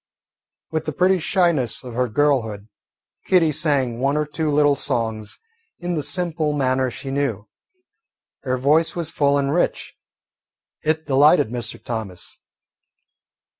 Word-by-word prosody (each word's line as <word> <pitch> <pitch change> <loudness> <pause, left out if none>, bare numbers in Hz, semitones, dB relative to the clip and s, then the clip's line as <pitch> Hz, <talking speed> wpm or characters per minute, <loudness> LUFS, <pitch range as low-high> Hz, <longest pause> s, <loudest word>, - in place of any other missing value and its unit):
With 160 0 -2
the 155 - -3
pretty 185 +4 +3
shyness 165 - +1
of 125 -2 -8 0.2
girlhood, 115 -9 +1 0.6
Kitty 170 -4 +4
sang 140 -6 0
one 140 +3 +1
or 150 - 0
two 155 +1 -3
little 145 -1 +3
songs 110 -4 -3 0.4
in 175 0 -3
the 155 - -1
simple 155 +1 -1
manner 130 -2 +1
she 135 +2 -7
knew. 130 -7 -2 0.9
Her 130 -1 -1
voice 150 +5 +2
was 165 -2 -3
full 140 -1 +2
and 140 0 0
rich. 175 - -1 0.9
It 155 0 -1
delighted 145 -2 +4
Mr. 120 -1 -4
Thomas. 110 -6 -6
145 Hz, 130 wpm, -21 LUFS, 125-155 Hz, 0.9 s, Kitty